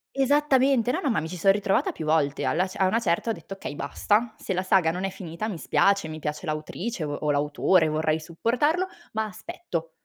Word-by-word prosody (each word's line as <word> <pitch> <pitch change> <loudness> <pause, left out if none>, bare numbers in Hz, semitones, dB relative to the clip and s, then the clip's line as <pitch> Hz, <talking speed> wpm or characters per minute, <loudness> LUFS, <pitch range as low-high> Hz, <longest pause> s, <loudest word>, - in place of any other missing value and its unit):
Esattamente. 270 -3 +3
No, 320 - -1
no, 290 - 0
ma 225 - +1
mi 160 - -4
ci 180 - -6
so' 185 +3 +3
ritrovata 195 -1 +1
più 160 - -7
volte. 155 -2 +1
Alla 180 +4 +1
cer 185 - -7
a 190 - +5
una 225 +5 +2
certa 225 0 0
ho - - +2
detto: 165 0 -9
"Okay 190 -6 -7
basta, 210 - 0
se 190 - -3
la 185 +1 -1
saga 185 -3 +3
non 180 +2 -4
è 195 - 0
finita 180 +2 -6
mi 205 -6 -4
spiace, 200 0 +2
mi 155 0 -7
piace 150 +2 -4
l'autrice, 155 +6 -4
o 145 -1 -3
o 150 0 -1
l'autore, 150 +4 +2
vorrei 155 0 0
supportarlo, 245 - 0 0.3
ma 220 0 0
aspetto." 215 - -6
185 Hz, 220 wpm, -26 LUFS, 155-225 Hz, 0.3 s, a